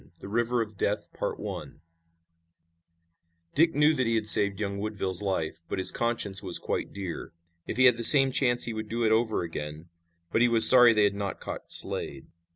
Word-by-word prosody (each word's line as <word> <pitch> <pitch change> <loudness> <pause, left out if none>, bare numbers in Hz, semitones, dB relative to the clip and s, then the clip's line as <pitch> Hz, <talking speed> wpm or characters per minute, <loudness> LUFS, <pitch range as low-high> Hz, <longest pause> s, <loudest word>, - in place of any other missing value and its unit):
THE - - -12
RIVER 120 +3 -2
OF 105 -2 -14
DEATH 105 - -3 2.4
Dick 165 +3 +1
knew 150 +2 +2
that 130 -5 -2
he 115 - -1
had 110 -1 -3
saved 100 -2 +3
young 100 -1 -5
Woodville's 100 -3 -4
life, 85 -5 -5
but - - -5
his 95 - 0
conscience 110 -5 -1
was 90 -4 -3
quite - - -6
dear. 95 -5 -9 0.3
If - - -7
he 130 - +3
had 125 -2 +4
the 115 - -5
same 135 +1 +6
chance 120 -2 +2
he 115 - -3
would 110 -1 -8
do 115 +1 -4
it 110 - 0
over 110 -3 -1
again, 75 0 -9 0.4
but 115 - -1
he 120 - +2
was 115 -1 +8
sorry 125 -2 +8
they 105 - +1
had 100 -1 0
not 100 -1 -7
caught - - -10
Slade. 65 - -3
110 Hz, 190 wpm, -25 LUFS, 100-120 Hz, 2.4 s, was